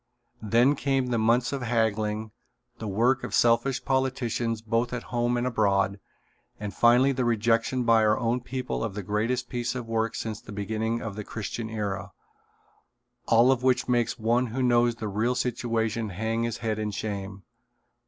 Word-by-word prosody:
Then 115 Hz, +6 st, +4 dB
came 135 Hz, -2 st, 0 dB
the 120 Hz, -2 st, 0 dB
months 120 Hz, +4 st, +2 dB
of 140 Hz, -, -3 dB
haggling, 110 Hz, -2 st, 0 dB, 0.5 s
the 110 Hz, -, -5 dB
work 120 Hz, +6 st, +2 dB
of -, -, -3 dB
selfish 120 Hz, +3 st, +2 dB
politicians 120 Hz, -4 st, -1 dB
both 115 Hz, +2 st, 0 dB
at 125 Hz, -, -3 dB
home 120 Hz, 0 st, +1 dB
and 120 Hz, -, -1 dB
abroad, 100 Hz, -4 st, +1 dB, 0.6 s
and 105 Hz, -1 st, -5 dB
finally 125 Hz, +3 st, +5 dB
the 130 Hz, -1 st, -1 dB
rejection 115 Hz, +2 st, +1 dB
by 115 Hz, -1 st, +4 dB
our 105 Hz, 0 st, +3 dB
own 120 Hz, +1 st, 0 dB
people 125 Hz, 0 st, -4 dB
of 110 Hz, -4 st, -4 dB
the 105 Hz, -, -4 dB
greatest 110 Hz, +6 st, -1 dB
piece 120 Hz, 0 st, -3 dB
of 120 Hz, -2 st, -5 dB
work 115 Hz, 0 st, -1 dB
since 110 Hz, -1 st, -4 dB
the -, -, -11 dB
beginning 110 Hz, +3 st, -2 dB
of 110 Hz, -3 st, -5 dB
the 105 Hz, -, -5 dB
Christian 110 Hz, +2 st, -5 dB
era, 100 Hz, -4 st, -4 dB, 1.1 s
all 115 Hz, +3 st, +5 dB
of 130 Hz, -2 st, +1 dB
which 130 Hz, -1 st, +2 dB
makes 120 Hz, -1 st, +1 dB
one 120 Hz, +2 st, +1 dB
who 125 Hz, +3 st, -2 dB
knows 120 Hz, -1 st, +3 dB
the 110 Hz, -2 st, -5 dB
real 110 Hz, +5 st, 0 dB
situation 115 Hz, -3 st, -1 dB
hang 110 Hz, +4 st, -2 dB
his 115 Hz, -1 st, -2 dB
head 110 Hz, -1 st, -1 dB
in 105 Hz, -1 st, -1 dB
shame. 100 Hz, -2 st, -5 dB
115 Hz, 175 wpm, -27 LUFS, 110-125 Hz, 1.1 s, finally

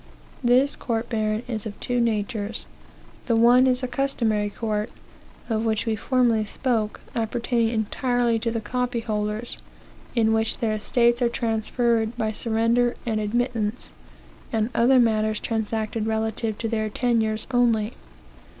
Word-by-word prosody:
This 255 Hz, +4 st, +4 dB
court 230 Hz, -1 st, -3 dB
baron 215 Hz, -1 st, -1 dB
is 225 Hz, -3 st, -4 dB
of 205 Hz, -, -9 dB
two 245 Hz, 0 st, -1 dB
natures; 210 Hz, -, -1 dB, 0.6 s
the 230 Hz, -, +2 dB
one 240 Hz, +3 st, +6 dB
is 255 Hz, 0 st, +1 dB
a -, -, 0 dB
customary 235 Hz, -5 st, 0 dB
court, 215 Hz, +1 st, -2 dB, 0.6 s
of 225 Hz, -2 st, 0 dB
which 220 Hz, -2 st, 0 dB
we 225 Hz, -1 st, 0 dB
formerly 235 Hz, -1 st, +2 dB
spoke, 220 Hz, -1 st, -2 dB
appertaining 230 Hz, 0 st, 0 dB
entirely 235 Hz, +1 st, 0 dB
to 230 Hz, -, -1 dB
the 230 Hz, -1 st, -2 dB
copy 245 Hz, +2 st, -2 dB
holders, 215 Hz, +1 st, -3 dB, 0.6 s
in 220 Hz, -2 st, +3 dB
which 220 Hz, 0 st, +1 dB
their 225 Hz, -3 st, 0 dB
estates 235 Hz, +3 st, +2 dB
are 240 Hz, -, +3 dB
transferred 230 Hz, 0 st, 0 dB
by 220 Hz, -2 st, 0 dB
surrender 230 Hz, +2 st, +1 dB
and 220 Hz, -2 st, 0 dB
admittance, 230 Hz, 0 st, -1 dB, 0.6 s
and 220 Hz, +1 st, 0 dB
other 255 Hz, +3 st, +4 dB
matters 215 Hz, -2 st, +2 dB
transacted 220 Hz, 0 st, -2 dB
relative 220 Hz, 0 st, -1 dB
to 225 Hz, -, -2 dB
their 220 Hz, -1 st, -1 dB
tenures 220 Hz, -1 st, 0 dB
only. 230 Hz, -4 st, +2 dB
225 Hz, 140 wpm, -24 LUFS, 215-240 Hz, 0.6 s, one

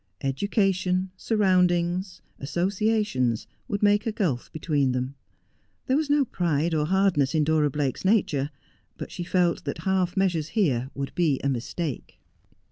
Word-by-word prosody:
Education, 185 Hz, +4 st, 0 dB
surroundings, 185 Hz, -3 st, +1 dB, 0.2 s
associations, 180 Hz, -, 0 dB, 0.2 s
would 200 Hz, 0 st, -2 dB
make 205 Hz, +2 st, +3 dB
a -, -, +1 dB
gulf 165 Hz, -, -2 dB
between 145 Hz, -5 st, 0 dB
them. 125 Hz, +2 st, -2 dB, 0.7 s
There 260 Hz, -, +1 dB
was 300 Hz, 0 st, 0 dB
no 290 Hz, -1 st, +3 dB
pride 170 Hz, -, 0 dB
or 150 Hz, -1 st, +1 dB
hardness 170 Hz, -6 st, +2 dB
in 155 Hz, -, +3 dB
Dora 150 Hz, -1 st, +2 dB
Blake's 140 Hz, -2 st, -2 dB
nature, 175 Hz, -9 st, +2 dB, 0.5 s
but -, -, -7 dB
she 175 Hz, -, -5 dB
felt 175 Hz, -1 st, +1 dB
that -, -, -3 dB
half 185 Hz, -1 st, 0 dB
measures 175 Hz, -5 st, +1 dB
here 130 Hz, -, +1 dB
would 140 Hz, 0 st, -4 dB
be 160 Hz, -6 st, +1 dB
a 140 Hz, -, +1 dB
mistake. 135 Hz, +3 st, -4 dB
175 Hz, 140 wpm, -26 LUFS, 145-195 Hz, 0.7 s, make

